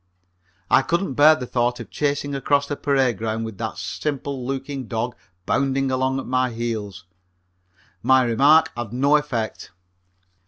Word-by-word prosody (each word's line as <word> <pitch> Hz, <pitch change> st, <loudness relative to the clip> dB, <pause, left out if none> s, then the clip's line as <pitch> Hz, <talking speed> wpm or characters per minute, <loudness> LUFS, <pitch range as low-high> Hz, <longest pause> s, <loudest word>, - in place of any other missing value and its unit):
I -, -, +6 dB
couldn't 170 Hz, +3 st, -1 dB
bear 150 Hz, +3 st, +6 dB
the 130 Hz, -, -5 dB
thought 120 Hz, 0 st, 0 dB
of -, -, -9 dB
chasing 145 Hz, -1 st, -1 dB
across 140 Hz, +1 st, +1 dB
the 145 Hz, -, -3 dB
parade 135 Hz, -7 st, +1 dB
ground 110 Hz, 0 st, -2 dB
with 110 Hz, -3 st, -8 dB
that 110 Hz, -2 st, -4 dB
simple 130 Hz, -, -4 dB
looking 135 Hz, 0 st, -4 dB
dog 115 Hz, +2 st, -3 dB, 0.3 s
bounding 135 Hz, 0 st, 0 dB
along 130 Hz, +1 st, 0 dB
at -, -, -6 dB
my 130 Hz, 0 st, +1 dB
heels. 110 Hz, -5 st, -5 dB, 1.0 s
My 130 Hz, 0 st, +4 dB
remark 145 Hz, +7 st, +4 dB
had 120 Hz, -2 st, -5 dB
no 140 Hz, +4 st, +3 dB
effect. 135 Hz, -7 st, -2 dB
130 Hz, 150 wpm, -22 LUFS, 115-140 Hz, 1.0 s, I